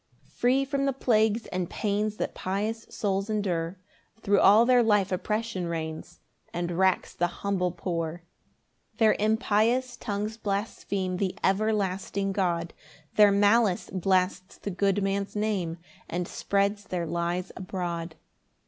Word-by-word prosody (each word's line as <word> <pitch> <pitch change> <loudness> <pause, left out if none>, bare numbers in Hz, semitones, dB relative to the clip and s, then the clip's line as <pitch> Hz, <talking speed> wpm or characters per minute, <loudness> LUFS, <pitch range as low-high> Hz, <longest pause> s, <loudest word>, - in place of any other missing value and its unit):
4 - - -29
Free 260 +3 +2
from 275 0 -1
the 275 - +1
plagues 220 -3 +2
and 180 -2 -2
pains 210 0 -1
That - - -2
pious 210 +4 -3
souls 195 -1 -1
endure, 185 -4 -1 0.4
Thro' 200 -2 +2
all 210 +4 +7
their 250 0 +5
life 210 -4 +3
oppression 210 0 -2
reigns 160 +1 -5 0.3
And 175 0 -2
racks 185 +2 +1
the 175 - +1
humble 180 0 -1
poor. 170 -1 -3 0.7
5 - - -35
Their 220 -2 +5
impious 220 +3 +2
tongues 210 0 -3
blaspheme 200 -3 -2
The 190 -1 -2
everlasting 195 -1 0
God; 175 -4 -1 0.4
Their 210 -1 +7
malice 205 -1 +3
blasts 185 0 0
the 200 - -5
good 195 +1 +1
man's 195 +1 -1
name, 200 -6 -1 0.3
And 175 0 -2
spreads 200 +1 0
their 180 -3 -2
lies 170 +2 -2
abroad. 175 -3 -4
200 Hz, 135 wpm, -27 LUFS, 180-215 Hz, 0.7 s, all